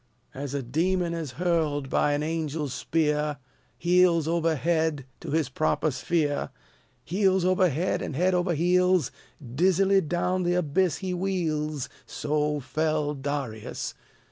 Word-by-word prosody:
As 140 +1 -5
a 140 - -2
demon 170 +7 0
is 160 -6 -4
hurled 155 -4 0
by 145 +2 +2
an 145 +1 0
angel's 155 -3 -2
spear, 150 +3 0 0.4
Heels 175 -2 +3
over 165 -1 +1
head, 160 -2 0
to - - -8
his 155 -2 +1
proper 155 +2 0
sphere, 150 0 -1 0.5
Heels 190 +2 +2
over 185 0 +3
head 165 +6 -1
and 145 - -4
head 180 +5 +2
over 175 -1 +1
heels, 180 -1 +3 0.3
Dizzily 185 +9 +2
down 180 +3 0
the 175 0 +1
abyss 180 +1 +1
he 185 - -1
wheels, 155 -6 -1 0.2
So 150 0 -1
fell 155 +1 -1
Darius. 135 -6 -4
160 Hz, 135 wpm, -26 LUFS, 145-180 Hz, 0.5 s, Heels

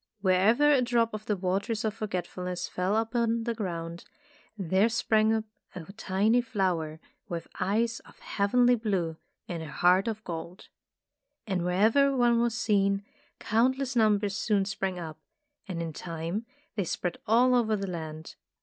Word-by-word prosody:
Wherever 210 +10 +4
a 275 -3 +4
drop 235 -2 +1
of 215 0 -6
the 210 - +1
Waters 200 +5 -1
of 215 - 0
Forgetfulness 180 -4 -4
fell 185 +4 0
upon 230 0 0
the 235 0 -1
ground, 170 -5 -5 0.5
there 190 +3 +2
sprang 220 -1 +2
up 220 -1 +1 0.3
a 180 +2 -8
tiny 215 +3 +2
flower 180 -9 -1 0.3
with 170 -2 -4
eyes 225 +4 0
of - - -19
heavenly 245 +5 +2
blue 195 -9 -1 0.3
and 170 -2 -4
a 160 - -7
heart 180 +4 +3
of 220 -1 -3
gold. 170 +1 -7 0.8
And 190 -5 -1
wherever 220 +10 +3
one 240 -1 +4
was 235 -1 +1
seen, 200 -2 +2 0.3
countless 255 +4 +1
numbers 210 -3 +2
soon 200 -2 +1
sprang 195 -2 -3
up, 160 -3 -7 0.5
and 170 -3 -3
in 165 -1 -5
time 170 +7 -4 0.3
they 205 - -1
spread 175 0 -3
all 245 +4 +5
over 225 -3 +3
the 200 -1 -3
land. 160 -3 -6
205 Hz, 150 wpm, -28 LUFS, 180-230 Hz, 0.8 s, all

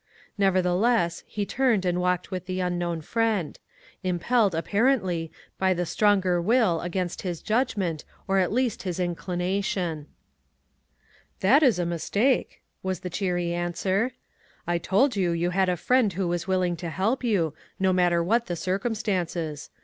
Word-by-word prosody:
Nevertheless, 185 0 +2
he 205 -1 -3
turned 235 -5 +1
and 180 0 +1
walked 180 +1 0
with 185 -1 -5
the 185 0 -2
unknown 175 -2 -1
friend; 220 -2 -1 0.4
impelled 190 +2 +1
apparently, 190 -3 +1 0.3
by 190 -1 +2
the 175 0 -1
stronger 190 -2 +2
will 210 -4 +2
against 175 0 -3
his 175 -3 -4
judgment, 210 - 0 0.2
or 195 0 +2
at 185 - +1
least, 245 0 0
his 180 -2 -4
inclination. 180 -2 -2 0.6
" - - -36
That 260 +11 +5
is 255 - +4
a 175 - 0
mistake," 200 - 0 0.2
was 185 0 -3
the 180 -2 -5
cheery 175 -2 -1
an 175 0 -2
swer; 200 +8 0 0.3
" - - -33 0.2
I 175 0 0
told 210 - +2
you 180 -4 +1
you 170 +1 0
had 190 0 +2
a 180 - 0
friend 250 +3 +2
who 185 +1 -1
was 175 +1 -2
willing 185 -2 +1
to 170 +1 -5
help 210 +10 -1
you, 185 - +1 0.3
no 190 -1 +3
matter 175 -2 +3
what 230 +7 +1
the 175 - -2
circumstances. 185 -5 -2
185 Hz, 155 wpm, -26 LUFS, 175-205 Hz, 0.6 s, That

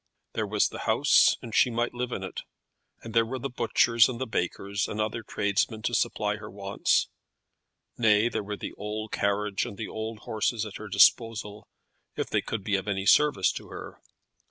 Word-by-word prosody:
There - - -2
was - - +2
the - - -8
house, - - +5
and 115 - -8
she 125 - +4
might 120 0 -1
live 125 0 -3
in 95 - -4
it; 95 - -6 0.6
and 115 - -8
there 115 0 +5
were 125 +4 -4
the 135 +2 -5
butchers 115 -1 +3
and 120 -2 -5
the 130 - -1
bakers, 100 -1 -2
and 105 - -5
other 110 +2 -1
tradesmen 105 +1 -1
to 120 - -1
supply 105 -3 0
her 105 0 -9
wants. 100 0 0 0.9
Nay; 110 -1 +4
there 120 - -2
were 105 0 -5
the - - -6
old 110 +1 -5
carriage 100 0 0
and 100 - -7
the 110 - -4
old 110 0 -5
horses 110 +1 -1
at 105 - -7
her 110 - -8
disposal, 105 +1 +3 0.5
if - - -3
they - - +2
could 110 -4 -4
be 100 0 0
of 95 +1 -6
any 95 -1 -1
service 110 -5 +4
to - - -8
her. - - -10
110 Hz, 195 wpm, -27 LUFS, 100-115 Hz, 0.9 s, house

